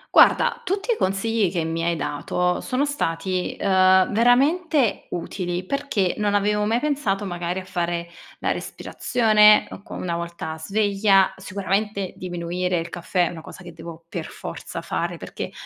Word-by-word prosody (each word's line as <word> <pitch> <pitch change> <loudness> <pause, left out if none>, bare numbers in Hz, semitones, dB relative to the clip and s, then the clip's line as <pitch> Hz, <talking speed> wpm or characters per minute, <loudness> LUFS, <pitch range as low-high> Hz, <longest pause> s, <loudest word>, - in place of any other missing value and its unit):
Guarda, - - +5
tutti 400 +5 0
i - - -3
consigli 195 +1 +1
che 170 -3 -1
mi 165 +1 -2
hai 170 -1 0
dato 180 +5 -1
sono 270 +2 0
stati, 185 - -2
uhm, 185 -1 +4
veramente 270 - +3
utili 175 +1 -4
perché 245 -7 0
non 205 -1 +1
avevo 210 +1 +2
mai 225 +3 +1
pensato, 250 -9 -1
magari, 175 0 -3
a 185 - -9
fare 170 -1 -2 0.3
la - - 0
respirazione 215 -3 +3
o - - -9
co - - -11
una 170 -2 -3
volta 170 -2 -5
sveglia, 195 +2 +2
sicuramente 195 +1 -2
diminuire 180 0 -2
il 165 - -4
caffè 175 +1 0
è - - -3
una 165 -2 -8
cosa 185 - -11
che 175 -1 -10
devo 165 0 -10
per 170 -2 -5
forza - - -7
fare, - - -3
perché - - -6
190 Hz, 155 wpm, -23 LUFS, 175-215 Hz, 0.3 s, Guarda